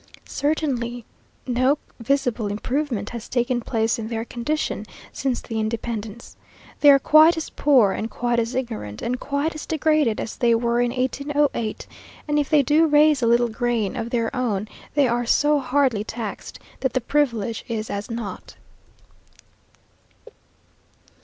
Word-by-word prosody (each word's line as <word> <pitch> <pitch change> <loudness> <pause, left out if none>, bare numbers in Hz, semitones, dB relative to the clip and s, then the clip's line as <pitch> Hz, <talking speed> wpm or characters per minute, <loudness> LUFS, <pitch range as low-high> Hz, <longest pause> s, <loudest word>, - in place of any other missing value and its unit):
Certainly 250 -6 -2 0.4
no 255 +3 +2 0.2
visible 245 -3 0
improvement 225 +1 -2
has 235 -2 -7
taken 245 0 0
place 225 0 0
in 220 - -4
their 225 0 -3
condition 240 -3 -3 0.3
since 260 -3 -2
the 225 -2 -4
independence. 225 0 -4 0.4
They 290 - +7
are 280 - +9
quite 310 +4 +6
as 320 - -5
poor 255 -9 +4
and 220 +3 -3
quite 240 0 0
as 230 +2 -2
ignorant, 220 - -4
and 250 +1 -2
quite 285 +3 -1
as 310 - -8
degraded 305 -7 +1
as - - -5
they 235 -1 +3
were 235 +1 +1
in 245 - +1
1808, 265 -1 -1 0.4
and 295 0 +2
if 290 - -1
they 300 -3 +4
do 305 +4 +4
raise 295 -2 +4
a 235 - +2
little 235 +1 +3
grain 235 -2 -1
of 230 -2 -3
their 235 +1 -1
own, 215 -5 -1 0.3
they 285 -3 +4
are 240 0 -1
so 295 +4 +3
hardly 260 -5 +1
taxed 220 -2 -6 0.2
that 265 - -1
the 255 - 0
privilege 235 -5 0
is 225 -2 -4
as 200 +3 -4
nought. 230 -3 -6
240 Hz, 150 wpm, -23 LUFS, 225-285 Hz, 0.4 s, are